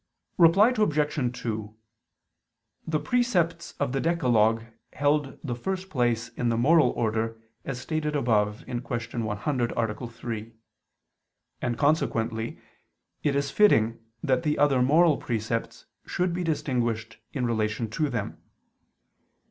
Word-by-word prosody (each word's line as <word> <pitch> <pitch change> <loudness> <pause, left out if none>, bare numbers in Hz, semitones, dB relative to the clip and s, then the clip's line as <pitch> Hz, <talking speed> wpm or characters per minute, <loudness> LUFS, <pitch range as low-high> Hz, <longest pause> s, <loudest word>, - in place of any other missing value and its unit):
Reply 195 +8 +6
Obj. 150 - 0
2: 110 -2 -4 1.1
The 155 -1 +1
precepts 185 - 0
of 140 -3 0
the 135 - -1
decalogue 115 -9 +2 0.3
held 145 0 +1
the 130 -5 -2
first 190 +9 -4
place 120 -4 0
in 120 0 -2
the 115 - +1
moral 150 +2 +5
order, 115 0 -1 0.3
as 125 -2 -4
stated 155 -2 -2
above 105 -6 +1
(Q. 120 -2 -4 0.4
100, 115 +4 -1
A. 115 +1 -2
3): 115 -1 -6 1.1
and 120 -1 -1
consequently 115 -6 0 0.6
it 145 -2 +1
is 140 0 0
fitting 115 - +4 0.2
that 130 -2 +1
other 140 -3 +3
moral 155 +4 +5
precepts 115 0 -3 0.2
should 180 -1 0
be 180 +1 -2
distinguished 120 -8 -1
in 130 -4 -2
relation 110 -1 -1
to 150 +5 0
them. 125 - -4
125 Hz, 120 wpm, -27 LUFS, 115-155 Hz, 1.1 s, Reply